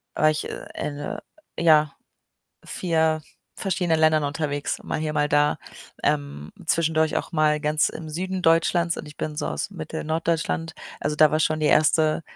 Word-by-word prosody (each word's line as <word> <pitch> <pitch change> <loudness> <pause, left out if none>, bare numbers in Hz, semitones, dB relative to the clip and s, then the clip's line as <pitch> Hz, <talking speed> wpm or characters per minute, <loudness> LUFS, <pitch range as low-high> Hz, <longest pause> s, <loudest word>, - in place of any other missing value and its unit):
war 155 - +4
ich 150 - -3
in, - - -6 0.4
äh, 145 - -5 0.4
ja, 155 -3 +4 0.7
4 160 -3 0 0.3
verschiedenen 180 -4 0
Ländern 155 -1 +4
unterwegs, 145 0 -2
mal - - -3
hier, 155 0 -2
mal 150 -1 +1
da. 150 0 +2 0.4
Ähm, 70 +1 -1 0.2
zwischendurch 160 -1 +2
auch - - -3
mal 155 -1 +2
ganz 150 +1 +2
im 160 -1 -8
Süden 185 +4 -3
Deutschlands 170 +1 +3
und - - -7
ich 150 - -12
bin 150 -1 -4
so - - -2
aus - - -3
Mittel, 160 -4 -6
Norddeutschland. 165 0 -1 0.3
Also, 150 - -1
da 155 -1 +6
war 155 - +1
schon 155 0 +1
die 150 - +2
1. 155 +1 +3
155 Hz, 165 wpm, -24 LUFS, 150-165 Hz, 0.7 s, da